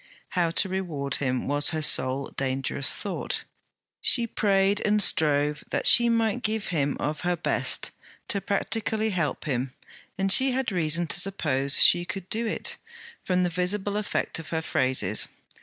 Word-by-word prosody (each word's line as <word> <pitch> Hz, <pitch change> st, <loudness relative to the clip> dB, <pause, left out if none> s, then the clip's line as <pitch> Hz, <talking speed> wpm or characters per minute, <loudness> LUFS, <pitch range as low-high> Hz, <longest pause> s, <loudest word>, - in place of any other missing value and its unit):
How 175 Hz, -2 st, 0 dB
to 180 Hz, +4 st, +1 dB
reward 165 Hz, -8 st, -3 dB
him, 130 Hz, -2 st, -1 dB
was 145 Hz, 0 st, +2 dB
her 155 Hz, -, -3 dB
sole 135 Hz, -1 st, +1 dB
dangerous 135 Hz, +1 st, 0 dB
thought. 200 Hz, -, -3 dB, 0.6 s
She 235 Hz, -, +5 dB
prayed 200 Hz, -2 st, +1 dB
and 210 Hz, 0 st, +2 dB
strove 150 Hz, -5 st, +2 dB
that -, -, -2 dB
she 235 Hz, 0 st, +6 dB
might 230 Hz, 0 st, +1 dB
give 220 Hz, -2 st, -2 dB
him 145 Hz, -5 st, -1 dB
of 150 Hz, 0 st, -3 dB
her 180 Hz, 0 st, 0 dB
best, 170 Hz, -, 0 dB, 0.4 s
to 200 Hz, -, -1 dB
practically 220 Hz, +2 st, -1 dB
help 170 Hz, -6 st, -2 dB
him; 130 Hz, -2 st, -3 dB, 0.4 s
and 195 Hz, 0 st, 0 dB
she 260 Hz, +6 st, +4 dB
had 260 Hz, -3 st, -1 dB
reason 170 Hz, -1 st, 0 dB
to -, -, 0 dB
suppose 140 Hz, -8 st, +1 dB
she 175 Hz, -, +6 dB
could 185 Hz, +1 st, -7 dB
do 230 Hz, +1 st, 0 dB
it, -, -, -3 dB, 0.5 s
from 180 Hz, -1 st, +1 dB
the 180 Hz, -, +1 dB
visible 190 Hz, +3 st, -1 dB
effect 210 Hz, -5 st, -1 dB
of 160 Hz, -, -9 dB
her 160 Hz, -1 st, -2 dB
phrases. 130 Hz, -9 st, +1 dB
175 Hz, 160 wpm, -26 LUFS, 145-205 Hz, 0.6 s, she